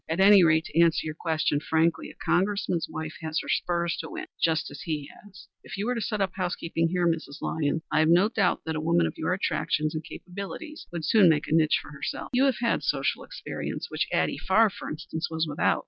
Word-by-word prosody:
At 165 +3 -1
any 195 -1 +8
rate, 160 0 +4
to 165 - -1
answer 170 -1 +4
your 155 - -3
question 155 -2 0
frankly, 160 +2 +1
a - - -13
Congressman's 180 -2 0
wife 155 0 -5
has 160 0 -3
her - - -10
spurs 170 -1 0
to - - -6
win - - -6 0.2
just 160 -1 +1
as - - -9
he 150 -3 -3
has. 200 -2 -15 0.2
If - - -8
you 200 - -2
were 245 - 0
to 230 - -3
set 210 0 -2
up 190 -1 +1
house 180 -2 -2
keeping, 165 0 -1
here, 175 0 +1
Mrs. 160 -3 -2
Lyons, 160 +1 -1
I've 155 0 +3
no 175 +4 +5
doubt 225 - +1
that 160 0 -2
a 155 - -2
woman 165 +1 +3
of - - -2
your 160 - -2
attractions 155 -4 0
and 155 0 -4
capabilities 200 - -8
would 170 -3 -4
soon 205 -6 +6
make 155 -1 +2
a - - -1
niche 160 -1 +4
for - - -11
herself. 145 - -5
You 255 +2 +4
have 270 -4 +2
had 235 - +1
social - - 0
experience, - - -6
which - - -1
Addie - - 0
Farr, 225 -2 +4
for - - -7
instance, 160 +1 -4
was 160 0 -1
without." 145 - +1
165 Hz, 230 wpm, -27 LUFS, 160-190 Hz, 0.2 s, any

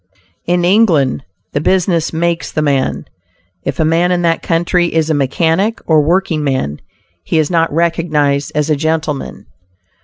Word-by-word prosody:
"In 175 0 +1
England, 175 - +2 0.3
the 145 - 0
business 175 -1 +1
makes 170 +1 -1
the 155 - -1
man." 140 -3 0 0.6
If - - -4
a 160 - +3
man 170 +3 +2
in 175 -1 0
that 165 -1 +1
country 175 +1 +1
is 160 -1 0
a - - +3
mechanic 165 - 0
or 155 -2 +4
working 165 0 0
man, 130 - -2 0.4
he - - -1
is 155 0 +1
not 165 -1 +1
recognized 155 -4 0
as 150 +1 0
a - - +3
gentleman. 155 -1 -3
160 Hz, 155 wpm, -15 LUFS, 150-175 Hz, 0.6 s, or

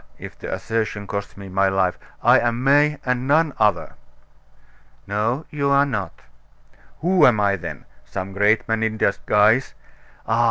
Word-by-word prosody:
if - - -10
the - - -7
assertion 110 -2 -3
costs 100 0 -6
me 100 -1 -9
my 95 +1 +1
life 95 -2 0 0.2
I'm 120 +1 +3
May 145 +2 +3
and 125 0 -1
none 155 +1 +2
other." 105 -5 +1 1.1
"No, 110 +8 -2
you 140 -2 -1
are 140 0 +4
not." 100 - -5 0.8
"Who 180 +3 +2
am 115 -4 +3
I 100 -1 +2
then? 95 - -8 0.2
Some 95 +1 -6
great 105 +4 +2
man 115 -1 -1
in 110 -1 -1
disguise? 105 +4 +2 0.5
Ah! 115 +1 0
110 Hz, 150 wpm, -21 LUFS, 100-135 Hz, 1.1 s, are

